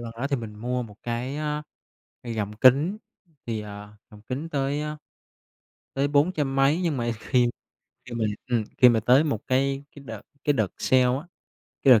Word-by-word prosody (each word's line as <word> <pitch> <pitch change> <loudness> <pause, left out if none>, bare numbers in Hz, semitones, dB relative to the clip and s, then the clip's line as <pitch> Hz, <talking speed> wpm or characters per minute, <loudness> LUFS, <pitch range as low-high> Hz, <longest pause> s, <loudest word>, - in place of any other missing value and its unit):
lần 115 -1 -6
đó 125 +4 -2
thì 140 - +2
mình 110 -3 -7
mua 125 +4 -2
một 105 -4 -11
cái, 120 +4 -3
ơ, 150 0 -2 0.6
gọng 110 -4 -3
kính 140 - +5 0.5
thì, 115 -2 -2
à, 105 0 -10
gọng 105 -2 -14
kính 130 +8 -4
tới, 140 -1 -1
ơ, 150 0 -4 1.0
tới 135 +1 +1
bốn 145 +4 +3
trăm 145 -6 -1
mấy 140 +5 +3
nhưng 165 -6 0
mà 120 -1 0
khi - - -13 0.7
khi 125 - -8
mà 115 -2 0 0.2
ừm, 120 -3 +1
khi 125 - +8
mà 115 -2 +3
tới 125 +6 +5
một 140 -9 -1
cái 135 +1 +1
cái 140 - -11
đợt 110 -4 -7 0.2
cái 145 - +3
đợt 110 -7 +1
sale 130 -1 +4
á, 125 +2 +1 0.6
cái 135 - +8
đợt 110 - +5
130 Hz, 195 wpm, -26 LUFS, 115-145 Hz, 1.0 s, khi